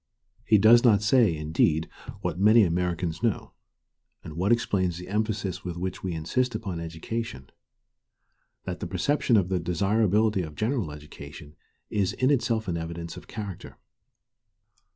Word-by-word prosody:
He 110 Hz, -, +4 dB
does 115 Hz, +4 st, +6 dB
not 110 Hz, -4 st, +4 dB
say, 105 Hz, -6 st, +4 dB
indeed, 80 Hz, +1 st, +1 dB, 0.3 s
what 85 Hz, -, -3 dB
many 110 Hz, +3 st, +6 dB
Americans 85 Hz, -2 st, -1 dB
know, 115 Hz, -3 st, -1 dB, 0.7 s
and 80 Hz, -, -8 dB
what 90 Hz, +7 st, 0 dB
explains 95 Hz, -7 st, +1 dB
the 90 Hz, 0 st, -8 dB
emphasis 105 Hz, -2 st, -2 dB
with 90 Hz, -2 st, -5 dB
which 90 Hz, +1 st, -4 dB
we 90 Hz, -2 st, -3 dB
insist 120 Hz, +10 st, -1 dB
upon 95 Hz, -6 st, -4 dB
education, 80 Hz, -, -5 dB, 1.1 s
that -, -, -5 dB
the -, -, -4 dB
perception 140 Hz, -5 st, +1 dB
of 95 Hz, -3 st, +1 dB
the 95 Hz, -1 st, 0 dB
desirability 100 Hz, +4 st, +1 dB
of 75 Hz, -3 st, -7 dB
general 110 Hz, -, -1 dB
education 75 Hz, 0 st, -11 dB, 0.4 s
is 100 Hz, -3 st, 0 dB
in 130 Hz, +2 st, +1 dB
itself 115 Hz, -5 st, 0 dB
an 85 Hz, -2 st, -1 dB
evidence 85 Hz, 0 st, -6 dB
of -, -, -11 dB
character. 100 Hz, -5 st, -7 dB
95 Hz, 145 wpm, -26 LUFS, 85-110 Hz, 1.1 s, does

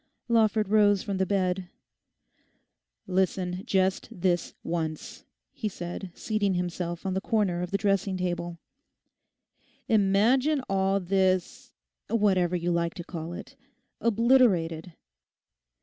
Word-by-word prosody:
Lawford 220 Hz, -2 st, +3 dB
rose 205 Hz, -1 st, +4 dB
from 200 Hz, -3 st, -3 dB
the 190 Hz, 0 st, 0 dB
bed. 185 Hz, -2 st, 0 dB, 1.4 s
'Listen 185 Hz, 0 st, 0 dB
just 190 Hz, -1 st, +1 dB
this 175 Hz, -1 st, -1 dB
once,' 160 Hz, -2 st, -4 dB, 0.3 s
he 215 Hz, -, -3 dB
said, 180 Hz, +1 st, -6 dB
seating 205 Hz, -3 st, 0 dB
himself 175 Hz, -1 st, -3 dB
on 190 Hz, -, -1 dB
the 190 Hz, -, -1 dB
corner 195 Hz, -6 st, 0 dB
of 180 Hz, -, -3 dB
the 200 Hz, -, 0 dB
dressing 195 Hz, -2 st, 0 dB
table. 175 Hz, -1 st, -3 dB, 1.3 s
'Imagine 230 Hz, +8 st, +3 dB
all 195 Hz, 0 st, +1 dB
this—whatever 185 Hz, +1 st, 0 dB
you 175 Hz, 0 st, -1 dB
like 170 Hz, -1 st, 0 dB
to 175 Hz, -, -6 dB
call 165 Hz, -1 st, -6 dB
it—obliterated. 200 Hz, -8 st, 0 dB
190 Hz, 105 wpm, -27 LUFS, 175-205 Hz, 1.4 s, rose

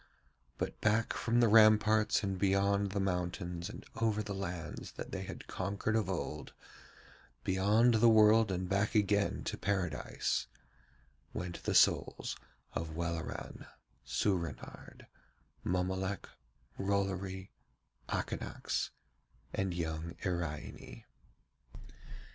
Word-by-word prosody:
But -, -, -4 dB
back 110 Hz, +1 st, +2 dB
from 120 Hz, +1 st, +2 dB
the 120 Hz, -, +6 dB
ramparts 110 Hz, 0 st, +5 dB
and 95 Hz, -2 st, -2 dB
beyond 100 Hz, +1 st, +2 dB
the 100 Hz, -, -1 dB
mountains 90 Hz, -2 st, -2 dB
and -, -, -9 dB
over 110 Hz, -2 st, +1 dB
the 100 Hz, -1 st, -4 dB
lands 90 Hz, -4 st, -5 dB
that -, -, -7 dB
they -, -, -3 dB
had -, -, -7 dB
conquered 100 Hz, +3 st, -2 dB
of 105 Hz, -4 st, +1 dB
old, 75 Hz, -5 st, -4 dB, 0.9 s
beyond 105 Hz, +6 st, +4 dB
the 115 Hz, +1 st, +6 dB
world 110 Hz, -1 st, +6 dB
and 90 Hz, 0 st, -2 dB
back 100 Hz, +4 st, +1 dB
again 100 Hz, -1 st, +2 dB
to -, -, -4 dB
Paradise, 90 Hz, -5 st, -1 dB, 0.9 s
went 90 Hz, -1 st, -5 dB
the -, -, -1 dB
souls -, -, +3 dB, 0.4 s
of 80 Hz, -1 st, -4 dB
Welleran, 85 Hz, -1 st, -4 dB, 0.4 s
Soorenard, 85 Hz, -, -3 dB, 0.6 s
Mommolek, 95 Hz, +2 st, -1 dB, 0.5 s
Rollory, 95 Hz, -1 st, -1 dB, 0.6 s
Akanax, -, -, -2 dB, 0.6 s
and 95 Hz, -1 st, 0 dB
young 85 Hz, -1 st, -3 dB
Iraine. 75 Hz, -8 st, -4 dB
95 Hz, 105 wpm, -33 LUFS, 90-105 Hz, 0.9 s, the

